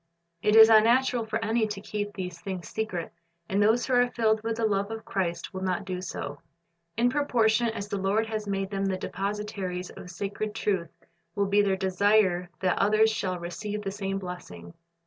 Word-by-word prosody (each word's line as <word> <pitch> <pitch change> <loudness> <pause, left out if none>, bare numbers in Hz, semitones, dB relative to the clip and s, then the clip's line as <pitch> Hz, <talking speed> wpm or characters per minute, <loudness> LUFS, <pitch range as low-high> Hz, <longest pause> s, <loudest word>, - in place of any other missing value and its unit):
It 210 - +3
is 220 0 +11
unnatural 230 +2 +4
for 220 - -1
any 220 0 +1
to 205 -2 -5
keep 205 0 -4
these 180 -2 -6
things 185 -1 -5
.secret, 205 -6 -4 0.3
and 195 +2 +1
those 220 +4 +3
who 260 - -1
are 245 0 +4
filled 220 -2 +1
with 225 0 -2
the 230 - +1
love 200 -1 0
of 225 0 -6
Christ 185 -2 -2
will 190 - -5
not 190 +1 -1
do 185 -1 -4
so. 145 -5 -5 0.6
In 235 +1 +4
proportion 240 -5 +2
as 220 -3 -4
the 200 -1 -3
Lord 200 +4 +1
has 215 -1 -4
made 195 0 -2
them 195 0 -1
the 190 -1 0
depositaries 195 -2 -4
of 180 - -10
sacred 200 +4 -4
truth 185 -5 -1 0.5
will 200 - +1
be 200 +1 +3
their 195 -2 +1
desire 190 -1 +2
that 185 -1 +1
others 215 +2 +4
shall 185 -4 -2
receive 205 +5 -5
the 195 - -3
same 195 -1 -3
blessing. 175 - -8
200 Hz, 190 wpm, -27 LUFS, 190-220 Hz, 0.6 s, is